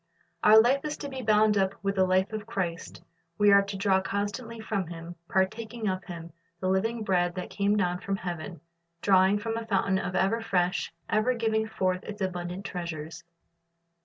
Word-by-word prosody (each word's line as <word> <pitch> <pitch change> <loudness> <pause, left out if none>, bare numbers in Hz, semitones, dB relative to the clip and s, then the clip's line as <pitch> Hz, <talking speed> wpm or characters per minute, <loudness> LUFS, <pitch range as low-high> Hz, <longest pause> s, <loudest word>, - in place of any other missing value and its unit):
Our 215 +1 +8
life 260 +5 +3
is 300 -1 -3
to 285 - -6
be 265 -1 -5
bound 215 -2 +4
up 190 0 +1
with 195 0 +1
the 190 -1 +2
life 185 +3 +2
of 215 0 -5
Christ; 180 -6 -4 0.3
we 205 0 +5
are 200 0 +7
to 200 0 -5
draw 190 -1 +2
constantly 205 +4 -3
from 200 -4 -2
Him, 165 0 -8
partaking 220 +4 -1
of 185 -1 -1
Him, 170 -2 -8 0.3
the 185 - -1
living 220 +4 0
bread 175 -3 +1
that 180 - -5
came 205 +1 +1
down 180 -2 0
from 195 +1 -2
heaven, 175 -3 -6 0.4
drawing 190 0 +5
from 225 +2 -3
a 230 -1 -5
fountain 195 -2 +1
ever 190 +5 0
fresh, 180 -6 0 0.2
ever 220 +4 +2
giving 220 -1 0
forth 185 -3 -1
its 210 -1 -7
abundant 180 0 -3
treasures. 170 -3 -5
195 Hz, 180 wpm, -28 LUFS, 185-220 Hz, 0.4 s, Our